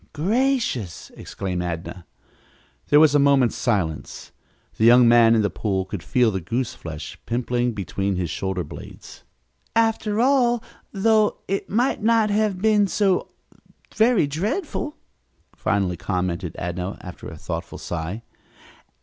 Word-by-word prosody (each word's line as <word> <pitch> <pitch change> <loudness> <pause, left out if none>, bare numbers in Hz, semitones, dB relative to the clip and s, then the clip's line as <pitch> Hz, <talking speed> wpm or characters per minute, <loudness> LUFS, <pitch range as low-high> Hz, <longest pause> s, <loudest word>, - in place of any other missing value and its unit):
"Gracious!" 205 - -1
exclaimed 90 -2 -4
Adnah. 85 0 -5 0.8
There 145 - +6
was 155 -2 +6
a 145 - +5
moment's 140 -4 +3
silence. 95 - -2 0.5
The - - 0
young 120 +1 +7
man 115 -1 +6
in 110 - +2
the 100 - +1
pool 95 -3 -2
could 95 -1 -6
feel 120 +4 +2
the 95 -2 -3
goose 120 +7 -2
flesh 75 -3 -8
pimpling 120 0 -1
between 100 -1 -2
his 90 -3 -2
shoulder 95 +1 -2
blades. 75 - -11 0.5
"After 225 -2 +1
all, 245 -2 +3 0.3
though, 215 +1 +2
it 195 +1 -2
might 240 +3 +1
not 220 -1 +3
have 210 -2 +1
been 210 0 +3
so 195 -1 +1 0.7
very 220 -5 +3
dreadful," 240 - -3 0.6
finally 95 -3 0
commented 90 -2 -3
Adnah, 90 +3 -4
after 90 -2 -9
a - - -10
thoughtful - - -6
sigh. 85 +7 -5
120 Hz, 130 wpm, -23 LUFS, -, 0.8 s, young